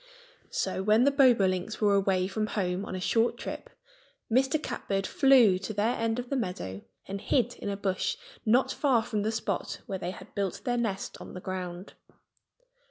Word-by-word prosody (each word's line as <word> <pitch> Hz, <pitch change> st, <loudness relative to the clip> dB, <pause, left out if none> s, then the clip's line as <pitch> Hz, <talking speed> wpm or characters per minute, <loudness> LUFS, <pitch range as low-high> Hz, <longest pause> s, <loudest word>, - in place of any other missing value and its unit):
So -, -, -1 dB
when 215 Hz, +4 st, +4 dB
the 280 Hz, -, +5 dB
Bobolinks 215 Hz, -8 st, +3 dB
were 205 Hz, -2 st, +3 dB
away 195 Hz, -2 st, +2 dB
from 215 Hz, +2 st, -2 dB
home 185 Hz, -1 st, -1 dB
on 185 Hz, -, -5 dB
a -, -, -3 dB
short 225 Hz, +5 st, +1 dB
trip -, -, -6 dB, 0.6 s
Mr. 265 Hz, +5 st, +3 dB
Catbird 195 Hz, -9 st, -2 dB
flew 245 Hz, -9 st, +5 dB
to 200 Hz, +2 st, -5 dB
their 215 Hz, +4 st, +1 dB
end 225 Hz, 0 st, -1 dB
of 245 Hz, +1 st, -5 dB
the -, -, +1 dB
meadow 180 Hz, -, -3 dB, 0.3 s
and 195 Hz, 0 st, -5 dB
hid 245 Hz, -2 st, +1 dB
in -, -, -4 dB
a 200 Hz, -, -2 dB
bush 190 Hz, -2 st, -1 dB, 0.3 s
not 240 Hz, +4 st, +3 dB
far 255 Hz, -6 st, +2 dB
from 215 Hz, -1 st, -2 dB
the 215 Hz, +2 st, 0 dB
spot 220 Hz, -, -3 dB
where 190 Hz, -1 st, -4 dB
they 175 Hz, -, -3 dB
had 190 Hz, +2 st, -10 dB
built 200 Hz, -3 st, -2 dB
their 245 Hz, -, 0 dB
nest 215 Hz, -5 st, -3 dB
on -, -, -9 dB
the -, -, -5 dB
ground. 185 Hz, 0 st, -6 dB
205 Hz, 185 wpm, -29 LUFS, 190-235 Hz, 0.6 s, the